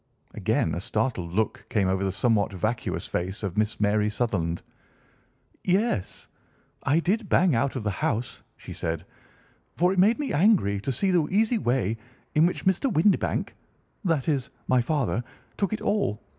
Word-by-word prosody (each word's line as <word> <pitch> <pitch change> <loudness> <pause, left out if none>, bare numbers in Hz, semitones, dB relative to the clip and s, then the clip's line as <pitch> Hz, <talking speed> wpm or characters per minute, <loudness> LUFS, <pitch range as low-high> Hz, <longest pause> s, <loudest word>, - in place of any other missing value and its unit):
Again - - 0
a - - -3
startled 90 -10 -1
look 110 +4 -1
came 100 -4 +1
over 95 +1 0
the 95 - 0
somewhat 100 +1 +2
vacuous 110 +5 -2
face 95 +5 -3
of 95 -4 -3
Miss 105 0 0
Mary 105 0 +2
Sutherland. 100 -7 -1 1.0
"Yes, 185 - 0 0.5
I 150 +4 +2
did 200 +5 0
bang 180 -4 +4
out 135 +4 +1
of 130 - -3
the 105 - 0
house," 115 +4 -2 0.2
she - - -9
said, 80 -1 -3 0.7
"for 180 +2 +3
it 190 - 0
made 215 +5 +5
me 280 -6 -2
angry 145 - +3
to 135 - -2
see 190 +10 +1
the 170 -4 +2
easy 220 +4 +2
way 120 - 0 0.4
in 155 +3 +5
which 180 - -4
Mr. 190 +8 +2
Windibank—that 170 - -1
is, 140 -6 0 0.2
my 130 -1 +4
father—took 140 - -2
it 215 - -3
all. 200 - 0
125 Hz, 160 wpm, -26 LUFS, -, 1.0 s, made